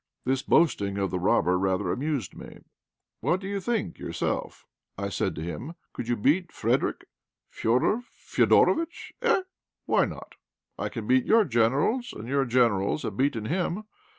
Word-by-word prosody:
This 130 0 +1
boasting 100 -14 +2
of 100 -1 -1
the 90 - -1
robber 90 0 +2
rather 95 -1 0
amused 140 - -2
me. - - -11 0.6
"What 180 - +1
do 195 - -7
you 200 0 -2
think 225 +3 -2
yourself?" - - -3 0.3
I - - -2
said - - -1
to 75 - -5
him. 100 - -6 0.2
"Could 115 - -5
you 120 - +1
beat 155 - +1
Frederick?" - - 0 0.5
"Fédor 125 - +2 0.3
Fédorovitch, 330 +1 +2
eh! 465 -6 +3 0.4
why - - +3
not? - - -9 0.5
I - - -2
can - - -6
beat 260 -1 +3
your 225 -1 +5
Generals, 140 - +1
and 110 +2 -8
your 135 +1 +1
Generals 115 -1 +2
have 105 - -4
beaten 130 -3 0
him. 180 - -1
135 Hz, 155 wpm, -27 LUFS, -, 0.6 s, your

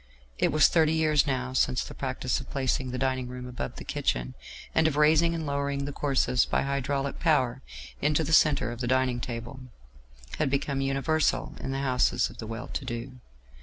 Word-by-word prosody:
It - - +2
was 155 0 +6
thirty 160 -2 +3
years 155 -2 +3
now 130 -2 -2
since 130 -1 +2
the - - -9
practice 130 -1 -2
of - - -10
placing 130 -1 -1
the 125 - -3
dining 130 -1 -1
room 125 0 -7
above 125 - -5
the - - -8
kitchen, - - -2 0.4
and 160 0 +4
of 155 - -1
raising 160 +3 +4
and 160 -1 -3
lowering 140 -1 -1
the 145 - -4
courses 135 -3 +1
by - - 0
hydraulic 140 0 -2
power 135 -6 +2 0.4
into 150 +2 +2
the 160 +2 -2
centre 150 -5 +4
of 120 - -7
the 120 - -1
dining 130 -1 +1
table, 120 +2 -6 0.8
had 155 - +2
become 140 0 -1
universal 135 +3 0
in - - -5
the 135 0 -2
houses 130 -2 +2
of - - -16
the 110 - -6
well 115 +3 -6
to - - -4
do. 125 +1 -6
135 Hz, 195 wpm, -27 LUFS, 125-145 Hz, 0.8 s, was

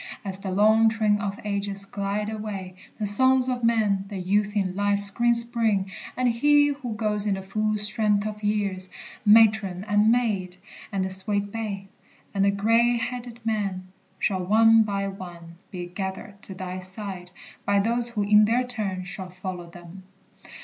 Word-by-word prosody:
As 190 -1 -3
the 195 - -5
long 215 +4 +4
train 215 -2 +1
Of 200 -1 -4
ages 200 -1 -3
glide 200 +1 -3
away, 205 -4 -6 0.2
the 215 - -2
sons 260 +5 +4
of 250 -2 -2
men 215 -4 +1
The 200 -1 -7
youth 205 +3 0
in 190 -3 -1
life's 200 0 +5
green 240 +3 +2
spring, 230 -5 +1 0.3
and 255 0 +1
he 290 +5 +4
who 270 -6 -5
goes 210 -1 0
In 200 - +1
the 190 - -7
full 215 +2 -1
strength 210 -1 +1
of 210 0 -5
years, 200 -3 -1 0.3
matron 210 -4 +4
and 210 +1 +3
maid, 200 -7 -1 0.3
And 195 -2 -1
the 190 - -4
sweet 200 +1 0
babe, 200 -3 -5 0.5
and 195 -1 +1
the 200 - +4
gray 230 +4 +2
headed 240 0 -6
man 195 -4 -2 0.3
Shall, 190 -2 -1
one 225 +4 +5
by 200 -2 -1
one, 175 -3 -10
be 180 -3 -6
gathered 190 +3 -7
to 190 - -9
thy 185 0 -6
side 185 -1 -7 0.3
By 200 0 +2
those 235 +3 0
who 215 -3 -2
in 210 +1 +5
their 235 +4 +1
turn 205 -7 -3
shall 185 0 -7
follow 180 -1 -7
them. 175 +2 -12
205 Hz, 170 wpm, -25 LUFS, 190-225 Hz, 0.5 s, life's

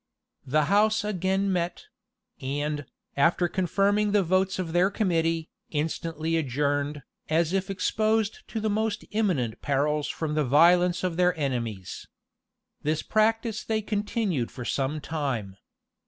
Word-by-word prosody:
The 150 +3 +2
house 210 +3 +3
again 190 -1 0
met; 175 -1 -2 0.6
and, 145 +1 -2 0.3
after 170 +4 +3
confirming 200 +3 +1
the 205 -2 +4
votes 185 +2 +1
of 175 -3 -3
their 180 +2 +4
committee, 165 -5 0 0.2
instantly 160 +1 -2
adjourned, 145 0 -1 0.3
as 165 +2 +2
if 190 0 0
exposed 215 +2 0
to 225 - -4
the 220 - -1
most 215 0 -1
imminent 180 - 0
perils 145 +1 0
from 155 -2 -3
the 150 0 +2
violence 175 +7 +4
of 180 -2 -1
their 180 -1 +3
enemies. 115 -9 -3 0.7
This 155 +1 -1
practice 225 0 +1
they 220 -1 -1
continued 205 - -1
for 125 - -8
some 140 +4 -1
time. 135 -12 -3
170 Hz, 130 wpm, -27 LUFS, 145-200 Hz, 0.7 s, the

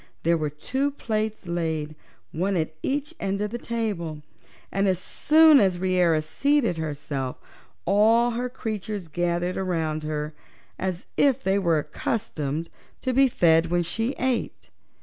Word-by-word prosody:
There 170 +1 +3
were 155 -2 -1
two 260 - -1
plates 220 -6 -3
laid, 160 -3 -2 0.4
one 190 +3 0
at 160 -1 -1
each 290 +2 -2
end 195 0 -1
of 210 0 -2
the 240 - -4
table, 190 -11 -3 0.5
and 195 +1 +1
as 185 -1 +2
soon 310 - +5
as 190 -3 +3
Reera 175 -4 +2
seated 255 - +1
herself 145 -4 -3 0.5
all 225 +4 +4
her 245 +2 -2
creatures 215 -5 -4
gathered 175 +2 -1
around 165 -5 -1
her, 150 0 -3 0.5
as 185 -1 -3
if 270 -2 +3
they 195 +1 +2
were 170 -4 +2
accustomed 155 -3 -3 0.3
to 255 - -1
be 270 +2 +5
fed 165 -7 +4
when 175 +1 +1
she 225 +10 -2
ate. 255 -2 -2
185 Hz, 145 wpm, -25 LUFS, 160-230 Hz, 0.5 s, soon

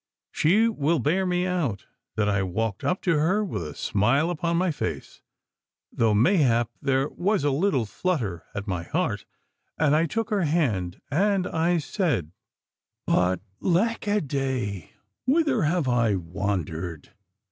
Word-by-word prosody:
She 205 +9 +3
will 170 -7 +1
bear 165 +8 +1
me 180 0 +1
out 160 - -1 0.3
that 105 -1 +1
I 100 -1 +1
walked 95 +2 -2
up 180 - -1
to 165 -5 +2
her 190 +8 +2
with 180 - -4
a 75 -3 -6
smile 120 - +1
upon 170 0 -1
my 180 0 +2
face, - - -5 0.7
though 110 -2 +2
mayhap 120 - +3
there 135 0 +1
was 195 -1 0
a 145 - +2
little 140 - +1
flutter 110 - -2
at 100 - -4
my 90 -4 -2
heart, 85 - -2 0.5
and 150 -1 +3
I 165 +2 +3
took 225 +4 -2
her 205 -2 +2
hand 115 - 0
and 195 +4 +2
I 170 +1 +1
said 145 - -1 0.7
but, 90 0 +2 0.2
lack 210 +5 +1
a 205 +1 +2
day, 130 - -3 0.3
whither 310 +3 +3
have 160 -1 +1
I 115 -4 +2
wandered? 90 -3 -4
145 Hz, 145 wpm, -25 LUFS, -, 0.7 s, She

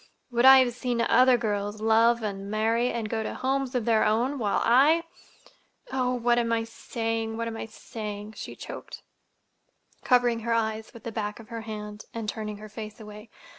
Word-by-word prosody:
Would 240 +1 +2
I 265 0 +10
have 245 -2 +1
seen 245 -1 -2
other 250 +2 +5
girls 205 -2 -2
love 225 +2 +3
and 200 -1 -4
marry 225 +3 +1
and 230 -2 -3
go 220 +1 -2
to 220 - -4
homes 265 0 -1
of 240 -3 0
their 225 -2 +3
own, 245 +6 +1
while 205 -3 +1
I—Oh, 270 - 0
what 240 0 +2
am 230 -1 0
I 230 0 +1
saying, 225 0 -3
what 230 0 -2
am 230 - -4
I 225 - -5
saying?" 210 -1 -7
she - - -8
choked, - - -9 1.0
covering 245 -2 +3
her 230 +1 -1
eyes 220 -1 -1
with 230 - -13
the 230 - -5
back 210 -1 -4
of 230 0 -13
her 230 -1 -5
hand, 210 -1 -7
and 225 -2 -4
turning 210 0 -4
her 215 +1 -10
face 215 +1 -8
away. 210 +1 -11
225 Hz, 185 wpm, -27 LUFS, 215-240 Hz, 1.0 s, I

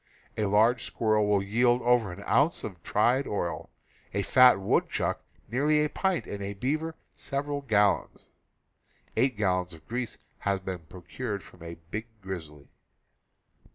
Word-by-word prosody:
A 110 - 0
large 110 +4 +3
squirrel 110 -2 +1
will 100 -1 +2
yield 120 +4 +2
over 120 -5 +3
an 100 +3 -9
ounce 150 +4 +3
of 90 -6 -7
tried 120 +9 +2
oil, 90 -4 -3 0.5
a 100 - +1
fat 125 -2 +6
woodchuck 95 - 0 0.2
nearly 150 +6 +2
a 150 - 0
pint, 190 +2 0
and 100 - -6
a 100 +1 -4
bear 155 +9 -2 0.2
several 145 +1 -3
gal 105 -6 +3
lons - - -18 0.4
— - - -38
eight 130 -4 +2
gallons 90 -4 0
of 80 - -18
grease 120 0 -3 0.2
have 100 -1 -1
been 95 -2 -3
procured 100 - -5
from 90 - -17
a 85 0 -7 0.2
big 110 +2 -4 0.2
grizzly. 80 -6 -7
105 Hz, 155 wpm, -28 LUFS, 95-125 Hz, 0.5 s, fat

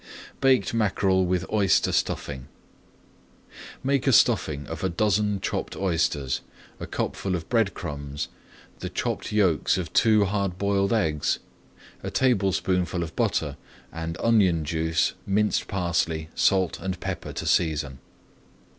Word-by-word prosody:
BAKED 130 -7 +3
MACKEREL 95 -4 +2
WITH 90 -1 0
OYSTER 100 -4 +3
STUFFING 65 -3 -2 1.4
Make 140 0 +1
a - - +5
stuffing 75 - +3
of 80 -1 -6
a 95 - +1
dozen 105 +2 +1
chopped - - -3
oysters, 80 -7 0 0.4
a - - -6
cupful 95 -2 -2
of 85 -2 -5
bread 115 -5 +2
crumbs, 70 -3 -5 0.5
the - - -4
chopped - - -3
yolks 95 -6 +2
of 90 -3 -4
two 110 -3 +4
hard 100 -2 -1
boiled 100 0 +1
eggs, 80 -10 +1 0.6
a - - -4
tablespoonful 95 -7 +1
of 80 0 -7
butter, - - 0 0.4
and 80 0 -4
onion 95 -9 +3
juice, 80 +1 0
minced 105 +2 +1
parsley, 85 -4 -1
salt, 95 -3 +2
and 95 -2 -4
pepper - - -4
to - - -5
season. 75 -6 +1
95 Hz, 130 wpm, -25 LUFS, 80-100 Hz, 1.4 s, a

